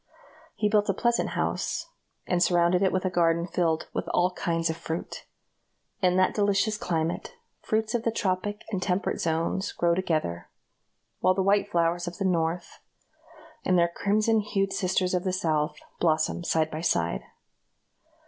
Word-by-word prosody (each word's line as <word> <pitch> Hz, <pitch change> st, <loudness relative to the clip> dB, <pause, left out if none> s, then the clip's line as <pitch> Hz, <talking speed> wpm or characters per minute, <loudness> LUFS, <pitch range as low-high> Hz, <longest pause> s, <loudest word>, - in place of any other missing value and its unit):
He 210 Hz, -, +1 dB
built 210 Hz, 0 st, +2 dB
a 195 Hz, -, +2 dB
pleasant 235 Hz, +2 st, +1 dB
house, -, -, -1 dB, 0.4 s
and 180 Hz, -1 st, 0 dB
surrounded 175 Hz, 0 st, +3 dB
it 190 Hz, -, +3 dB
with 185 Hz, 0 st, -1 dB
a 185 Hz, -, 0 dB
garden 170 Hz, -1 st, +2 dB
filled 165 Hz, -2 st, 0 dB
with -, -, -3 dB
all 180 Hz, +1 st, +2 dB
kinds 165 Hz, -2 st, -1 dB
of -, -, -5 dB
fruit. 165 Hz, 0 st, -6 dB, 0.7 s
In 180 Hz, -1 st, +3 dB
that 185 Hz, 0 st, +3 dB
delicious 205 Hz, +1 st, +2 dB
climate, 170 Hz, -, -2 dB, 0.3 s
fruits 220 Hz, 0 st, -1 dB
of 240 Hz, -, +1 dB
the 230 Hz, -, 0 dB
tropic 205 Hz, -1 st, -2 dB
and 190 Hz, -3 st, -2 dB
temperate 185 Hz, 0 st, -1 dB
zones 165 Hz, +4 st, -1 dB
grow 170 Hz, 0 st, +1 dB
together; 155 Hz, -, -1 dB, 0.7 s
while 185 Hz, -, +3 dB
the 190 Hz, -, +1 dB
white 200 Hz, +1 st, +2 dB
flowers 170 Hz, -1 st, +1 dB
of 175 Hz, 0 st, -5 dB
the 195 Hz, -, -2 dB
North, 170 Hz, -1 st, -1 dB, 0.8 s
and 185 Hz, -, +3 dB
their 170 Hz, 0 st, +4 dB
crimson 215 Hz, +5 st, +1 dB
hued 195 Hz, -2 st, -1 dB
sisters 185 Hz, 0 st, 0 dB
of 180 Hz, -1 st, +1 dB
the 185 Hz, -, 0 dB
South, 160 Hz, -4 st, 0 dB, 0.2 s
blossom 160 Hz, +1 st, +1 dB
side 160 Hz, -2 st, +1 dB
by 155 Hz, -, -4 dB
side. 85 Hz, -, 0 dB
180 Hz, 160 wpm, -27 LUFS, 165-195 Hz, 0.8 s, their